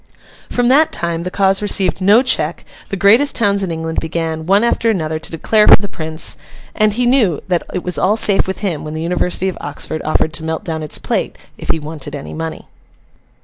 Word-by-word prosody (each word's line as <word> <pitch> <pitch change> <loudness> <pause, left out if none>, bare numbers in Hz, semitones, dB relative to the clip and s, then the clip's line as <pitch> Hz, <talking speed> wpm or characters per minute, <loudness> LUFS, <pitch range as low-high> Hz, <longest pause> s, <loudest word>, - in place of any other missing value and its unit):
From 245 -1 0
that 300 +4 +4
time, 170 -1 -1
the 180 - -4
cause 195 +1 +1
received 195 -2 +2
no 205 +6 +5
check; 170 - -1 0.2
the - - -3
greatest 225 +10 +4
towns 200 -3 +2
in 190 - -1
England 160 0 -3
began, 160 0 -3
one 200 +3 +4
after 235 -1 +1
another, 160 -7 -1
to 165 - -6
declare 210 +6 +2
for - - +10
the 200 - -4
Prince; 160 -3 -1 0.4
and 215 -1 +2
he 245 +3 0
knew 235 - +2
that 180 -2 +1
it 180 - -4
was 180 - -2
all 205 +4 +2
safe 200 -4 +3
with 190 - -4
him 180 -7 -2
when 155 0 -6
the 160 - -3
University 180 +2 -1
of 185 - -4
Oxford 145 +2 -6
offered 155 0 0
to 165 - -4
melt 160 -1 -3
down 160 -2 -4
its 155 - -2
plate, - - -2 0.2
if - - -10
he - - +2
wanted 150 -1 -7
any 140 - -8
money. 160 0 -6
180 Hz, 215 wpm, -16 LUFS, 160-205 Hz, 0.4 s, for